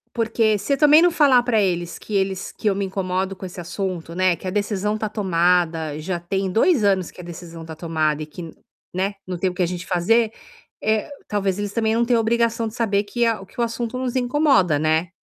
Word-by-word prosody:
Porque 225 Hz, -2 st, +1 dB
se 205 Hz, +8 st, -1 dB
eu -, -, +1 dB
também 300 Hz, +2 st, +7 dB
não 355 Hz, -, +6 dB
falar 280 Hz, -7 st, +5 dB
pra 240 Hz, -3 st, +1 dB
eles 175 Hz, -3 st, -1 dB
que 215 Hz, -, -9 dB
eles 190 Hz, -1 st, -1 dB
que -, -, -4 dB
eu 195 Hz, -, 0 dB
me 200 Hz, 0 st, -1 dB
incomodo 190 Hz, 0 st, -2 dB
com 190 Hz, -, -7 dB
esse 180 Hz, -, -10 dB
assunto, 175 Hz, -1 st, -4 dB
né, 185 Hz, 0 st, +2 dB
que 185 Hz, -, -9 dB
a -, -, -1 dB
decisão 205 Hz, +1 st, -1 dB
tá 215 Hz, 0 st, -3 dB
tomada, 170 Hz, -6 st, +1 dB
já 175 Hz, +3 st, -3 dB
tem 190 Hz, +2 st, -2 dB
2 235 Hz, -, +3 dB
anos 190 Hz, -3 st, +2 dB
que -, -, -17 dB
a -, -, -7 dB
decisão 170 Hz, -1 st, -9 dB
tá 160 Hz, 0 st, -8 dB
tomada 155 Hz, -2 st, -1 dB
e 155 Hz, -, -5 dB
que, 165 Hz, +1 st, -9 dB, 0.4 s
né, 195 Hz, +3 st, -1 dB
não 180 Hz, -2 st, -4 dB
tem 185 Hz, -, +1 dB
o 180 Hz, -, -8 dB
que 180 Hz, -, +1 dB
a -, -, +3 dB
gente 180 Hz, +1 st, -5 dB
fazer, 215 Hz, +6 st, +2 dB, 0.5 s
eh, 215 Hz, -1 st, +1 dB, 0.2 s
talvez 200 Hz, -2 st, -1 dB
eles 205 Hz, -1 st, -3 dB
também 220 Hz, -1 st, +1 dB
não 235 Hz, +1 st, +2 dB
têm 240 Hz, 0 st, +2 dB
a -, -, +3 dB
obrigação 230 Hz, 0 st, +1 dB
de 220 Hz, -, -8 dB
saber 205 Hz, -4 st, +1 dB
que 235 Hz, +4 st, 0 dB
a 225 Hz, -3 st, 0 dB
o -, -, -10 dB
que 195 Hz, -, -15 dB
o -, -, +3 dB
assunto 235 Hz, +1 st, -3 dB
nos 255 Hz, -1 st, -3 dB
incomoda, 245 Hz, -, +3 dB
né? 160 Hz, +3 st, +1 dB
195 Hz, 240 wpm, -22 LUFS, 175-225 Hz, 0.5 s, também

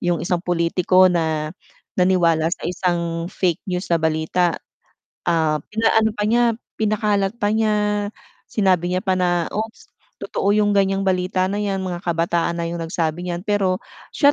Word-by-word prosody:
yung 175 Hz, -1 st, +1 dB
isang 175 Hz, -1 st, 0 dB
pulitiko 180 Hz, +1 st, +3 dB
na 155 Hz, -2 st, -1 dB, 0.5 s
naniwala 170 Hz, -3 st, +3 dB
sa 170 Hz, -, -4 dB
isang 170 Hz, -1 st, -1 dB
fake 180 Hz, -4 st, -1 dB
news 180 Hz, 0 st, -2 dB
na 165 Hz, -, +3 dB
balita. 160 Hz, +2 st, +1 dB, 0.7 s
Ah, 160 Hz, -3 st, +2 dB
pinaano 220 Hz, 0 st, +2 dB
pa 210 Hz, -, -1 dB
niya, 235 Hz, +3 st, +3 dB, 0.4 s
pinakalat 210 Hz, -2 st, +1 dB
pa 205 Hz, -2 st, 0 dB
niya, 210 Hz, -2 st, +1 dB, 0.4 s
sinabi 185 Hz, -4 st, +2 dB
niya 185 Hz, +1 st, -1 dB
pa 190 Hz, -, +2 dB
na, 175 Hz, -1 st, +1 dB
"Oops, 220 Hz, +1 st, -4 dB, 0.4 s
totoo 200 Hz, -, -2 dB
yung 210 Hz, 0 st, +3 dB
ganyang 195 Hz, 0 st, +2 dB
balita 185 Hz, 0 st, +1 dB
na 200 Hz, -, -2 dB
yan 200 Hz, -2 st, -1 dB
mga 180 Hz, -2 st, -5 dB
kabataan 170 Hz, 0 st, 0 dB
na 170 Hz, -, -2 dB
yung 170 Hz, 0 st, -4 dB
nagsabi 165 Hz, +1 st, -2 dB
niyan." 175 Hz, +1 st, -4 dB
Pero, 200 Hz, -3 st, +1 dB, 0.4 s
siya 285 Hz, -1 st, +5 dB
180 Hz, 155 wpm, -21 LUFS, 170-205 Hz, 0.7 s, siya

